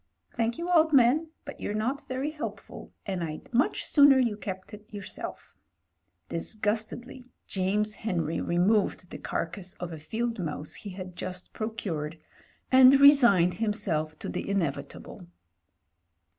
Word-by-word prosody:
Thank 235 0 0
you, 340 - -4
old 320 -2 +4
man, 275 +5 +5 0.2
but 285 - -9
you're 205 - -3
not 255 +7 -2
very 265 +4 -2
helpful, 310 +1 -7
and 190 -3 -3
Fd 160 +6 -6
much 250 +6 +1
sooner 285 -2 +6
you 240 -5 +2
kept 190 -1 -7
it 210 +2 -12
yourself." 205 -3 -8 0.7
Disgustedly 220 - -3 0.2
James 205 +3 0
Henry 170 -7 -2
removed 180 +1 +1
the - - -7
carcase 180 +2 -4
of 175 -1 -6
a 160 - -7
field 230 +8 -3
mouse 150 -3 -4
he 205 - -7
had 185 -1 -8
just 180 0 -7
procured, 170 -8 -4 0.5
and 260 +1 +8
resigned 240 -12 +7
him 215 -2 +2
self 155 -7 -2
to - - -7
the - - -4
inevitable. 165 - -3
210 Hz, 140 wpm, -28 LUFS, 180-250 Hz, 0.7 s, and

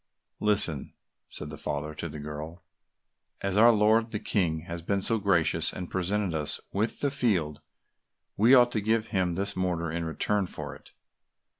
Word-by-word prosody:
"Listen," 100 -9 +1 0.3
said - - -2
the - - -8
father 75 +1 -3
to 85 +2 -5
the 75 - -8
girl, 75 +3 -7 0.8
"as 100 -1 -1
our 115 +3 +7
lord 110 +1 +3
the 110 - -3
King 85 -7 0
has 85 +1 -6
been 100 +4 0
so 110 +3 0
gracious 95 -5 +2
and 90 -1 -7
presented 95 0 -1
us 75 -2 -1
with 105 +4 -1
the 140 - +1
field, 95 - 0 0.7
we 115 +6 +6
ought 120 -1 +5
to 110 - -1
give 110 +1 0
him 95 -4 0
this 100 +2 -2
mortar 85 -3 -1
in 85 +1 -2
return 95 +4 0
for - - -6
it." - - -17
95 Hz, 170 wpm, -28 LUFS, 80-105 Hz, 0.8 s, our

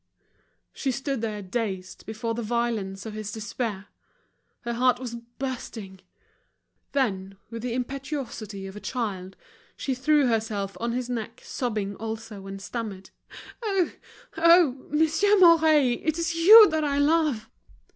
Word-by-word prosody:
She 275 - -2
stood 270 0 -2
there 210 -3 -3
dazed 190 -2 -4
before 225 +1 -3
the 235 - -3
violence 220 -4 -2
of 220 - -6
this 215 -1 -5
despair. 215 -2 -4 0.8
Her 235 0 -3
heart 250 +1 +3
was 245 -2 -6
bursting. 235 -5 -7 0.9
Then, 195 -8 -1
with 230 0 -6
the 240 0 -3
impetuosity 250 -6 -5
of 195 +1 -8
a - - -7
child, 200 -7 -4 0.4
she 270 - -2
threw 290 +3 +3
herself 215 -4 -1
on 235 0 -2
his 250 0 -2
neck, 230 -2 -5
sobbing 210 -5 -3
also, 220 -2 -6
and 195 0 -7
stammered: 200 -2 -6 0.5
"Oh! 345 - +1
Monsieur 320 +7 +3
Mouret, 315 -8 +5
it's 330 +1 0
you 415 +7 +9
that 315 -1 0
I 285 -1 0
love!" 290 -6 +2
235 Hz, 130 wpm, -26 LUFS, 215-285 Hz, 0.9 s, you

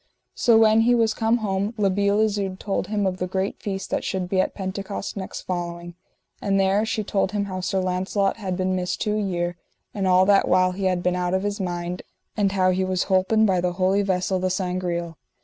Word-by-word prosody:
So 230 -2 +4
when 220 0 +5
he 245 +2 +4
was 225 -2 +2
come 225 +2 +1
home 200 +3 -1
La 200 -2 +2
Beale 200 +2 +2
Isoud 200 -3 -1
told 195 -2 -2
him 205 -1 -1
of 185 -1 -1
the 180 - -2
great 190 +2 -3
feast 195 -2 -4
that - - -1
should 185 -2 -2
be 185 0 +2
at - - -3
Pentecost 195 +1 -5
next 190 -2 -6
following, 175 -1 -5 0.5
and 195 -1 +1
there 195 +3 +2
she 215 - -1
told 195 -1 -1
him 205 -1 0
how 185 -2 -5
Sir 190 +1 -1
Launcelot 190 +2 0
had 190 -4 -3
been 185 0 0
missed 180 -1 -2
two 210 0 0
year, 175 -4 -2 0.4
and 195 -2 -1
all 185 0 +5
that 200 0 +4
while 185 0 +3
he 190 +1 -4
had 180 -1 +1
been 180 0 +1
out 180 0 0
of 190 - -1
his 205 +1 -2
mind, 175 -1 -3 0.3
and 200 -2 +1
how 185 -1 +3
he 185 +1 0
was 185 0 -1
holpen 190 +4 +3
by 185 -3 +2
the 180 0 0
holy 190 +2 +2
vessel, 185 -1 0
the 185 0 0
Sangreal. 180 -3 -2
190 Hz, 220 wpm, -23 LUFS, 185-200 Hz, 0.5 s, when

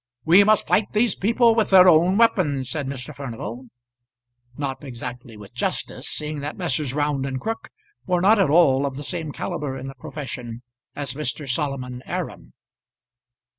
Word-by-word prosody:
"We 180 +5 +7
must 215 0 +3
fight 205 - +1
these 215 0 +2
people 230 +3 +3
with 225 -1 +1
their 185 -1 +8
own 175 +3 +5
weapons," 145 - +2
said 145 -1 -3
Mr. 135 +2 -6
Furnival; 125 -2 -7 0.9
not 140 -1 -4
exactly 120 -3 -8
with 105 -1 -13
justice, - - -3
seeing 150 0 -3
that 145 +2 -5
Messrs. 150 -6 -1
Round 145 -2 0
and 135 -1 -3
Crook 225 +6 -4 0.4
were 180 -1 +2
not 205 +4 +5
at 190 - +3
all 140 -4 +4
of 135 -1 -6
the 145 - -6
same 160 -1 -4
calibre 135 -2 -4
in 130 - -7
the 135 - -6
profession 125 -3 -7 0.3
as 140 -3 -4
Mr. 145 0 -4
Solomon 125 -2 -2
Aram. - - -5
145 Hz, 165 wpm, -23 LUFS, 130-180 Hz, 0.9 s, their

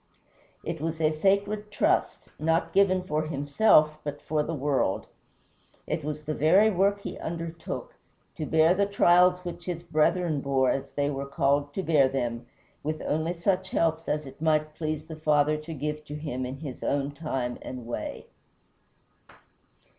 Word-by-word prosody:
It 165 -2 -4
was 160 0 -3
a 155 -1 +3
sacred 200 +5 +1
trust, 315 - 0
not 165 +2 +1
given 185 -1 +3
for 155 -3 -1
himself 155 +1 +3
but 145 0 -5
for 155 0 -1
the 150 - -3
world. 135 -8 0 0.8
It 155 0 -2
was 150 +1 -4
the 155 0 -2
very 190 +9 +5
work 200 +2 +2
he - - -6
undertook, 170 - -5 0.4
to 155 -3 -4
bear 160 +2 +4
the 200 +1 +1
trials 180 -2 +4
which 175 0 -6
his 175 -2 -4
brethren 160 -1 +1
bore 135 -2 +2
as 135 0 -3
they 145 0 +1
were 140 0 -4
called 140 0 +1
to 190 - -1
bear 145 -6 +4
them, 120 -3 -3 0.3
with 155 +1 -3
only 160 +3 -1
such 190 +1 0
helps 165 0 0
as 150 0 -1
it 135 +2 -12
might 155 -1 +1
please 155 -1 -3
the 160 0 -8
Father 150 -1 +2
to 155 +2 -8
give 150 0 -4
him 145 -4 -4
in 135 +2 -7
his 140 -5 -7
own 140 0 0
time 135 -5 -3
and 125 -2 -7
way. 120 - -5
155 Hz, 160 wpm, -27 LUFS, 145-170 Hz, 0.8 s, very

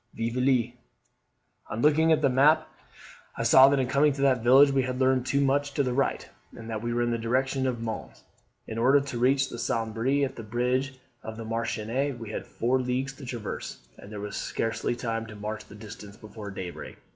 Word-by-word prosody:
'Vieville.' 120 +1 +1 1.0
"On 115 - -3
looking 160 +2 +4
at 155 -1 +3
the - - +5
map, 140 +5 +4 0.7
I - - -2
saw 130 +1 +7
that 140 - +2
in 130 - +1
coming 140 +4 +3
to 140 - -5
that 130 -4 +3
village 135 +4 +6
we 135 -1 +2
had 130 0 -3
leaned 130 -1 +2
too 140 - +1
much 140 +1 0
to 140 - +2
the 125 -2 -1
right, 135 +2 -1 0.3
and 115 - -9
that 110 -1 -3
we 120 +1 -3
were 120 0 0
in 120 - 0
the 115 - -1
direction 130 +3 0
of 120 -3 -3
Mons. 110 -1 -6 0.4
In 110 0 -5
order 135 +4 +5
to 140 -4 -5
reach 135 +2 +2
the 120 - -7
Sambre 120 +3 0
at 135 0 -7
the - - -5
bridge 125 +4 -1 0.3
of 110 0 -8
Marchiennes, 115 +4 -2
we 115 -3 -8
had - - -5
four 125 +3 0
leagues 130 +2 -2
to 135 -1 -11
traverse; 120 -4 -5 0.2
and 100 - -12
there 105 - -6
was 105 0 -6
scarcely 115 +1 -2
time 115 -1 -3
to 110 - -10
march 105 +1 -6
the 105 - -14
distance 105 -1 -11
before 105 -1 -9
daybreak. 95 -3 -7
125 Hz, 205 wpm, -27 LUFS, 115-135 Hz, 1.0 s, saw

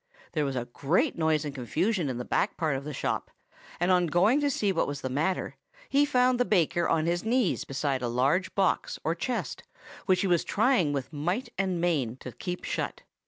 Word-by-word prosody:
There 150 - 0
was 135 -1 -2
a 120 -1 -2
great 165 - 0
noise 160 -2 +1
and 145 - -4
confusion 155 - -1
in 125 - -3
the 125 - -4
back - - 0
part 155 -5 0
of 135 +1 -5
the 150 - -4
shop; 140 - -2 0.5
and 175 +2 +2
on 180 -1 +4
going 195 - +3
to 290 - +2
see 210 -7 +1
what 175 - 0
was 145 -1 -4
the 130 - -3
matter, 160 +8 -1 0.3
he 285 +1 +4
found 250 -2 +3
the - - +5
baker 175 -6 +2
on 160 -1 +2
his 175 +1 0
knees 230 -2 +1
beside 135 -1 -1
a 125 - -1
large 135 +10 +1
box 195 -2 +1
or 160 - +1
chest, 240 +8 -3 0.5
which 185 -2 +3
he 195 - +1
was 175 -2 +3
trying 215 - +2
with 140 +1 -4
might 175 - -2
and 185 -2 -1
main 150 -9 0
to 125 -1 -9
keep 180 - -5
shut. - - -3
170 Hz, 210 wpm, -28 LUFS, 140-195 Hz, 0.5 s, the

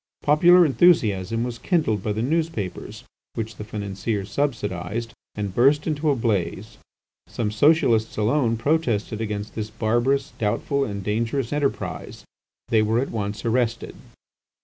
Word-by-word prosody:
Popular 175 +4 +6
enthusiasm 115 - +3
was 120 -1 -5
kindled 150 - 0
by 105 - -2
the 110 +2 -2
newspapers 155 - -3 0.3
which 110 0 -5
the - - -6
financiers 100 -1 -4
subsidised, 115 -4 -2 0.2
and 100 -2 -3
burst 140 +6 +3
into 155 -1 0
a 140 - +3
blaze. 110 -3 -2 0.5
Some 105 -3 -3
Socialists 115 -3 +3
alone 115 +1 +1
protested 115 -5 0
against 105 -1 -4
this 110 -1 -4
barbarous, 120 +5 0
doubtful, 140 +6 0
and 100 -3 -5
dangerous 115 +5 -1
enterprise. 145 -2 -3 0.4
They 110 -2 +4
were 110 +1 +1
at 135 - -2
once 105 0 -4
arrested. 115 0 0
115 Hz, 130 wpm, -23 LUFS, 105-140 Hz, 0.5 s, Popular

